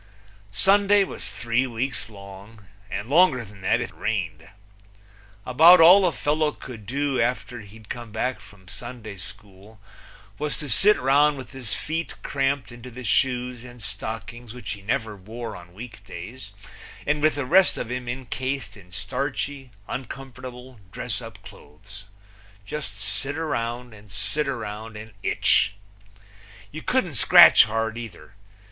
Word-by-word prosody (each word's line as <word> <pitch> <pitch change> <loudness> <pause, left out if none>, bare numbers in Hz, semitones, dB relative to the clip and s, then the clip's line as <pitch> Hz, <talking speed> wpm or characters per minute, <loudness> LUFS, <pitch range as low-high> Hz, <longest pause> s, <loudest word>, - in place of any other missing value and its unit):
Sunday 200 - +5
was - - -6
three 120 +2 0
weeks 125 +1 -3
long, 100 +1 -12 0.2
and 100 +1 -4
longer 140 -5 +4
than 100 -1 -14
that 95 - +2
if - - -4
it - - -21
rained. 80 -7 -3 1.0
About 165 +8 +8
all 180 +4 +8
a - - +2
fellow 150 0 +1
could 110 -6 -10
do 135 0 0
after 120 0 -1
he'd 105 +1 -14
come 120 -1 -7
back 125 +4 -2
from 95 -3 -17
Sunday 115 -2 -8
school 100 +3 -12 0.6
was 150 0 -2
to 150 - -5
sit 200 - +6
round 145 +3 +4
with 130 -2 -9
his 130 -5 -3
feet 165 +2 -3
cramped 135 -2 -1
into 120 +1 -10
the 125 +1 -9
shoes 125 +2 0
and 120 -2 -11
stockings 110 +3 -5
which 120 -3 -6
he 100 - -6
never 110 +1 -2
wore 110 +4 -7
on 85 -1 -12
week 110 +2 -10
days 100 +5 -9 0.5
and 150 0 +1
with 155 +1 +3
the 145 -2 -2
rest 185 +7 +5
of 120 - -4
him 125 0 -4
incased 130 +2 -4
in 90 -4 -16
starchy, 135 +6 -3 0.2
uncomfortable 130 -1 -8
dress 115 0 -4
up 115 -2 -10
clothes 100 +6 -13 0.6
just 110 -4 -5
sit 105 +8 -3
round 120 -6 -3
and 105 -1 -15
sit 135 +10 -1
round 110 -3 -5
and 110 0 -10
itch. 100 - +3 1.0
You - - -7
couldn't - - 0
scratch - - +9
hard 110 +1 -2
either. 100 -7 -10
120 Hz, 150 wpm, -25 LUFS, 105-135 Hz, 1.0 s, scratch